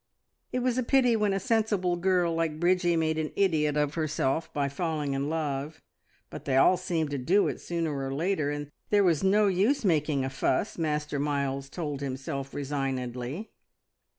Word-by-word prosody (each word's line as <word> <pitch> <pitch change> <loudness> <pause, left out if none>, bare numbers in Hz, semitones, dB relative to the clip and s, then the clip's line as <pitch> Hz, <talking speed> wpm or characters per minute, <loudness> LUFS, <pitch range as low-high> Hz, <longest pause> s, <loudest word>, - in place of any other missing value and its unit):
It 250 0 -1
was 255 0 +1
a - - +1
pity 250 -1 +3
when 210 -2 +1
a 195 - 0
sensible 210 -5 +1
girl 175 -1 +1
like 165 -2 -1
Bridgie 175 0 +2
made 160 -1 +1
an 155 -1 -2
idiot 155 -6 +2
of 150 -1 +1
herself 155 -1 -1
by 145 -2 0
falling 150 -1 -2
in 140 +2 -1
love, 150 -1 -3 0.5
but - - -8
they 135 -2 +1
all 180 - +6
seemed 170 -4 -2
to 140 - -2
do 185 +11 +3
it - - -4
sooner 165 -3 -2
or 135 -1 -3
later, 155 +1 0
and 145 0 -4 0.2
there 205 -1 +4
was 170 -4 +2
no 205 +2 +4
use 205 +8 +2
making 150 -6 +2
a - - -2
fuss, 135 +9 -1
Master 150 -2 -1
Miles 140 -1 -1
told 145 -3 -4
himself 135 0 -4
resignedly. 135 - -3
155 Hz, 180 wpm, -28 LUFS, 140-185 Hz, 0.5 s, all